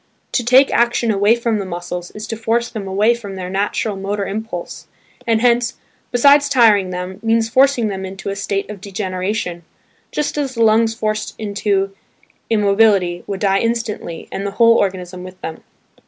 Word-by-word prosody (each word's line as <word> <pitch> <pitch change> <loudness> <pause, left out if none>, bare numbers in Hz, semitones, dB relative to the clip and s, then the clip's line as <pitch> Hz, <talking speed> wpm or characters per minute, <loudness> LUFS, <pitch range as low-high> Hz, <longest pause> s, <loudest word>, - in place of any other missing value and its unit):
To 245 - 0
take 255 +3 +5
action 235 -1 +2
away 205 +2 +3
from 230 -2 -1
the - - -2
muscles 175 0 -5
is 210 0 -6
to 225 - -2
force 225 +2 0
them 210 -4 -6
away 205 +5 +3
from 205 -5 -7
their 185 -1 -5
natural 205 +2 -1
motor 200 +1 -3
impulse, 210 -4 -6 0.4
and 225 -1 +2
hence, 240 -1 +2 0.4
besides 285 +3 +5
tiring 220 -8 +4
them, 180 +1 -5
means 225 0 +1
forcing 260 -1 +3
them 190 -2 -4
into 195 +1 -6
a 195 - -3
state 200 0 -2
of 200 -3 -9
degeneration; 185 -2 -3 0.5
just 300 0 -2
as 270 -3 -2
the 230 - +2
lungs 225 +1 +3
forced 215 -1 -2
into 200 -2 -1 0.6
immobility, 200 -4 +3
would 195 -1 -4
die 195 -1 +3
instantly 230 -7 -3
and 195 - -4
the 200 - -2
whole 230 -1 +6
organism 185 -3 -1
with 185 0 -11
them. 160 0 -6
210 Hz, 170 wpm, -18 LUFS, 195-230 Hz, 0.6 s, whole